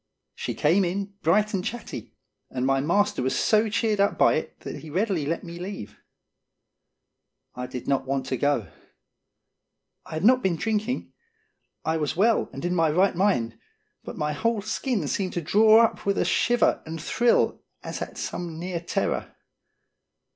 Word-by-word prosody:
She -, -, -4 dB
came 175 Hz, +7 st, +3 dB
in, 195 Hz, +3 st, -2 dB
bright 210 Hz, +6 st, +2 dB
and 190 Hz, -2 st, -1 dB
chatty, 240 Hz, +4 st, -6 dB, 0.3 s
and 125 Hz, 0 st, -2 dB
my 135 Hz, 0 st, +2 dB
master 185 Hz, +3 st, +1 dB
was 130 Hz, +1 st, 0 dB
so 215 Hz, 0 st, +3 dB
cheered 215 Hz, -1 st, 0 dB
up 200 Hz, 0 st, +2 dB
by -, -, +5 dB
it -, -, -3 dB
that -, -, -6 dB
he 160 Hz, -, -10 dB
readily 180 Hz, -3 st, 0 dB
let 165 Hz, +2 st, -2 dB
me 170 Hz, 0 st, -8 dB
leave. 140 Hz, -, -7 dB, 1.5 s
I 125 Hz, 0 st, -5 dB
did 125 Hz, -1 st, -7 dB
not 135 Hz, -1 st, 0 dB
want 135 Hz, -1 st, -1 dB
to 130 Hz, 0 st, -2 dB
go. 120 Hz, -, 0 dB, 1.4 s
I -, -, -6 dB
had 160 Hz, +5 st, -1 dB
not 255 Hz, +2 st, +6 dB
been 185 Hz, -6 st, +1 dB
drink 215 Hz, +4 st, -1 dB
ing; 250 Hz, -, -4 dB, 0.7 s
I 160 Hz, +1 st, +1 dB
was 150 Hz, 0 st, -2 dB
well 225 Hz, +3 st, +3 dB
and 135 Hz, -, -6 dB
in 175 Hz, -, 0 dB
my 165 Hz, -3 st, +3 dB
right 185 Hz, +5 st, +3 dB
mind, 120 Hz, -, +1 dB, 0.4 s
but -, -, -8 dB
my 150 Hz, 0 st, -1 dB
whole 225 Hz, +5 st, 0 dB
skin 215 Hz, -, -1 dB
seemed 185 Hz, +4 st, -2 dB
to -, -, -1 dB
draw 220 Hz, +6 st, +6 dB
up -, -, -4 dB
with 200 Hz, 0 st, 0 dB
a -, -, +2 dB
shiver 240 Hz, 0 st, +2 dB
and 160 Hz, +1 st, -6 dB
thrill 240 Hz, +8 st, +2 dB, 0.2 s
as -, -, -5 dB
at -, -, -6 dB
some 170 Hz, -2 st, -4 dB
near 175 Hz, +1 st, -3 dB
terror. 170 Hz, -, -2 dB
180 Hz, 175 wpm, -25 LUFS, 150-210 Hz, 1.5 s, not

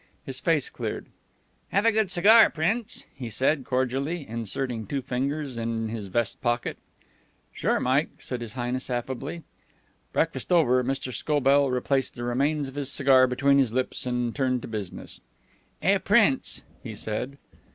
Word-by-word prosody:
His 130 Hz, -1 st, -5 dB
face 155 Hz, -1 st, +2 dB
cleared. -, -, -5 dB, 0.6 s
"Have 200 Hz, +3 st, +1 dB
a 230 Hz, -, +6 dB
good 220 Hz, -3 st, +1 dB
cigar, 215 Hz, +6 st, +7 dB
Prince?" 200 Hz, +8 st, -1 dB
he 125 Hz, -3 st, -6 dB
said, 135 Hz, +5 st, +1 dB
cordially, 135 Hz, +5 st, -1 dB
inserting 115 Hz, 0 st, -3 dB
two 135 Hz, +3 st, -2 dB
fingers 135 Hz, +1 st, -2 dB
in 115 Hz, -1 st, -2 dB
his 110 Hz, -3 st, -5 dB
vest 115 Hz, +3 st, -1 dB
pocket. 120 Hz, -1 st, -1 dB, 0.8 s
"Sure, -, -, +1 dB
Mike," 135 Hz, +5 st, +2 dB
said 125 Hz, -2 st, -5 dB
His 115 Hz, -2 st, -6 dB
Highness 125 Hz, +1 st, -3 dB
affably. 130 Hz, +6 st, -4 dB, 0.7 s
Breakfast -, -, -1 dB
over, 130 Hz, -8 st, +4 dB
Mr. 135 Hz, 0 st, -3 dB
Scobell 140 Hz, -1 st, +3 dB
replaced 130 Hz, +1 st, 0 dB
the 120 Hz, -, -6 dB
remains 140 Hz, +4 st, 0 dB
of 135 Hz, -, -9 dB
his 140 Hz, -1 st, -3 dB
cigar 135 Hz, -2 st, +5 dB
between 140 Hz, +2 st, +3 dB
his 125 Hz, -5 st, +2 dB
lips, 130 Hz, 0 st, -1 dB
and 125 Hz, -1 st, -1 dB
turned 130 Hz, -3 st, 0 dB
to -, -, -5 dB
business. 105 Hz, -5 st, -6 dB, 0.6 s
"Eh, -, -, +4 dB
Prince?" -, -, +2 dB, 0.2 s
he -, -, -7 dB
said. 125 Hz, +6 st, -4 dB
130 Hz, 150 wpm, -26 LUFS, 120-145 Hz, 0.8 s, cigar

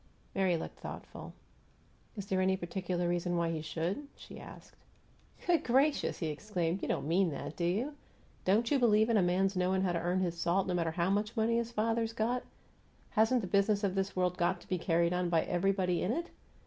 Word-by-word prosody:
Mary 185 Hz, -3 st, +2 dB
looked -, -, -7 dB
thoughtful. -, -, -8 dB, 0.9 s
"Is 200 Hz, -, -4 dB
there 190 Hz, -1 st, 0 dB
any 190 Hz, 0 st, +2 dB
particular 180 Hz, -1 st, -2 dB
reason 175 Hz, 0 st, 0 dB
why 170 Hz, -1 st, +1 dB
he 160 Hz, -1 st, -3 dB
should?" 170 Hz, -, -3 dB
she -, -, -11 dB
asked. -, -, -12 dB, 0.7 s
"Good 345 Hz, -2 st, +3 dB
gracious!" 270 Hz, +5 st, +2 dB
he 165 Hz, -, -3 dB
exclaimed. 175 Hz, +2 st, -2 dB
"You -, -, -2 dB
don't -, -, -1 dB
mean 180 Hz, +3 st, +3 dB
that, 145 Hz, 0 st, -6 dB
do 170 Hz, -, -1 dB
you? 220 Hz, +12 st, 0 dB, 0.5 s
Don't 220 Hz, +7 st, +2 dB
you 285 Hz, -, +4 dB
believe 220 Hz, -1 st, +4 dB
in 225 Hz, -, +4 dB
a -, -, +4 dB
man's 190 Hz, +2 st, +2 dB
knowing 185 Hz, +1 st, +1 dB
how 185 Hz, -, +1 dB
to 170 Hz, -1 st, -1 dB
earn 180 Hz, +2 st, 0 dB
his 175 Hz, -2 st, -1 dB
salt, 175 Hz, +3 st, +1 dB
no 185 Hz, -, -1 dB
matter 170 Hz, -2 st, +1 dB
how 170 Hz, +3 st, 0 dB
much 210 Hz, +3 st, -1 dB
money 225 Hz, +1 st, +2 dB
his 235 Hz, 0 st, -2 dB
father's 225 Hz, 0 st, 0 dB
got? 235 Hz, +3 st, 0 dB, 0.7 s
Hasn't 225 Hz, +3 st, +3 dB
the 190 Hz, -, -4 dB
business 200 Hz, +2 st, +2 dB
of 195 Hz, -2 st, +1 dB
this 195 Hz, 0 st, -1 dB
world 180 Hz, -1 st, 0 dB
got 175 Hz, -, +1 dB
to -, -, -17 dB
be 185 Hz, -, -1 dB
carried 170 Hz, 0 st, +2 dB
on 180 Hz, -1 st, 0 dB
by 165 Hz, -2 st, +3 dB
everybody 180 Hz, -1 st, +1 dB
in 185 Hz, -, 0 dB
it? 340 Hz, +4 st, -4 dB
190 Hz, 210 wpm, -32 LUFS, 175-215 Hz, 0.9 s, you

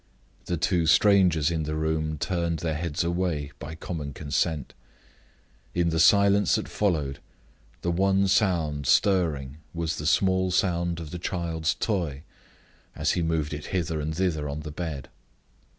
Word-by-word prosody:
The 85 Hz, -, -1 dB
two 85 Hz, 0 st, +1 dB
strangers 85 Hz, -2 st, +4 dB
in 80 Hz, -1 st, -1 dB
the 75 Hz, 0 st, -3 dB
room 80 Hz, 0 st, -1 dB
turned 85 Hz, 0 st, -1 dB
their 80 Hz, 0 st, -2 dB
heads 80 Hz, 0 st, -2 dB
away 85 Hz, -4 st, -1 dB
by 75 Hz, +4 st, -7 dB
common 80 Hz, -4 st, -5 dB
consent. 75 Hz, 0 st, -2 dB, 1.0 s
In 85 Hz, -1 st, +2 dB
the 80 Hz, 0 st, 0 dB
silence 100 Hz, +2 st, +5 dB
that -, -, -2 dB
followed, 75 Hz, -9 st, -1 dB, 0.6 s
the 85 Hz, -, +1 dB
one 95 Hz, +2 st, +2 dB
sound 85 Hz, -, +1 dB
stirring 75 Hz, -, +2 dB, 0.2 s
was 85 Hz, -1 st, -2 dB
the 75 Hz, -, -3 dB
small 95 Hz, +1 st, +2 dB
sound 85 Hz, -2 st, 0 dB
of 80 Hz, -3 st, -7 dB
the 90 Hz, -, -5 dB
child's 85 Hz, -2 st, -1 dB
toy, 85 Hz, -10 st, -2 dB, 0.7 s
as -, -, +1 dB
he 90 Hz, -, 0 dB
moved 80 Hz, -2 st, -1 dB
it 75 Hz, 0 st, -6 dB
hither 85 Hz, -4 st, -2 dB
and 80 Hz, +1 st, -3 dB
thither 80 Hz, -6 st, 0 dB
on 70 Hz, +2 st, -4 dB
the 75 Hz, 0 st, -7 dB
bed. 75 Hz, -4 st, -5 dB
80 Hz, 150 wpm, -26 LUFS, 75-90 Hz, 1.0 s, silence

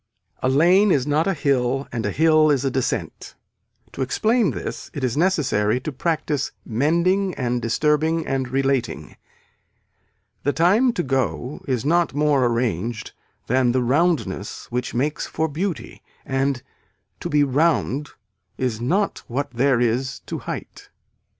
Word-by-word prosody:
A 130 Hz, -, +1 dB
lane 175 Hz, +9 st, +5 dB
is 135 Hz, -6 st, +2 dB
not 150 Hz, +4 st, +1 dB
a 195 Hz, -, +1 dB
hill 135 Hz, -2 st, 0 dB
and 115 Hz, -2 st, -3 dB
a -, -, -1 dB
hill 155 Hz, +2 st, +4 dB
is 140 Hz, -2 st, +2 dB
a 135 Hz, -, +1 dB
descent. 130 Hz, -1 st, -3 dB, 0.6 s
To -, -, -6 dB
explain 215 Hz, -, +2 dB
this -, -, -5 dB
it 140 Hz, -, -4 dB
is 125 Hz, -2 st, 0 dB
necessary 135 Hz, -, +1 dB
to 155 Hz, -, -4 dB
practice 150 Hz, -1 st, -1 dB
mending 170 Hz, -, +1 dB
and 125 Hz, -2 st, -1 dB
disturbing 150 Hz, +7 st, +1 dB
and 135 Hz, -2 st, -2 dB
relating. 135 Hz, -1 st, -1 dB, 1.3 s
The 145 Hz, -, 0 dB
time 205 Hz, +10 st, +4 dB
to 175 Hz, -, -1 dB
go 130 Hz, -, -2 dB
is 130 Hz, -2 st, -1 dB
not 170 Hz, -1 st, +2 dB
more 145 Hz, -4 st, +3 dB
arranged 115 Hz, -2 st, -2 dB, 0.3 s
than 125 Hz, -1 st, +2 dB
the 130 Hz, -1 st, +1 dB
roundness 125 Hz, -, 0 dB
which 125 Hz, 0 st, -3 dB
makes 145 Hz, +5 st, -1 dB
for 160 Hz, -, -1 dB
beauty 170 Hz, +3 st, -4 dB, 0.2 s
and 135 Hz, -1 st, -1 dB, 0.6 s
to -, -, -4 dB
be 150 Hz, -1 st, +3 dB
round 145 Hz, 0 st, +1 dB, 0.5 s
is 120 Hz, -4 st, -2 dB
not 190 Hz, -, 0 dB
what 140 Hz, +4 st, -3 dB
there 125 Hz, +1 st, +2 dB
is 125 Hz, +2 st, 0 dB
to -, -, -6 dB
height. -, -, -7 dB
140 Hz, 145 wpm, -22 LUFS, 125-160 Hz, 1.3 s, lane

